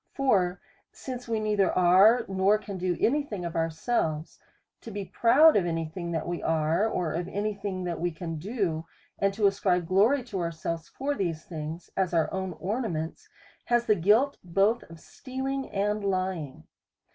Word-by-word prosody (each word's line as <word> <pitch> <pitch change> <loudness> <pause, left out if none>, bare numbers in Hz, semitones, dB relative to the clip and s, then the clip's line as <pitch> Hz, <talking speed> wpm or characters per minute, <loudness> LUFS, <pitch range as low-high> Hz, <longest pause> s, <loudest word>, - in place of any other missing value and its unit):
For 195 -10 +2 0.3
since 250 -2 -7
we 225 -1 0
neither 210 -3 +2
are, 195 +7 +5
nor 195 +2 +3
can 200 -3 -7
do 180 -1 -1
any 290 +6 +3
thing 205 -11 -6
of 170 - -5
ourselves, 165 -1 -1 0.4
to - - -9
be 200 -2 -5
proud 260 - +5
of 185 -4 +2
any 165 -1 -1
thing 170 +2 -6
that 160 -1 -2
we 175 0 -3
are, 160 +6 +1
or 175 -7 -2
of 175 +2 -2
any 205 +2 -2
thing 195 -2 -4
that 175 -2 -3
we 175 - 0
can 165 -1 -6
do, 175 -5 -2 0.3
and 200 0 +2
to 215 -1 +1
ascribe 185 -3 +2
glory 210 +10 +3
to 210 -6 -5
ourselves 165 -1 -4
for 280 +2 -2
these 170 - -2
things, 160 0 -7
as 185 -2 0
our 165 - +1
own 190 -1 -3
ornaments, 175 -2 -4 0.4
has 240 0 +2
the 215 - +4
guilt 210 +10 +3
both 195 +6 +2
of 165 0 -12
stealing 265 - -5
and 210 +1 -1
lying. 185 - -2
190 Hz, 175 wpm, -27 LUFS, 170-215 Hz, 0.4 s, are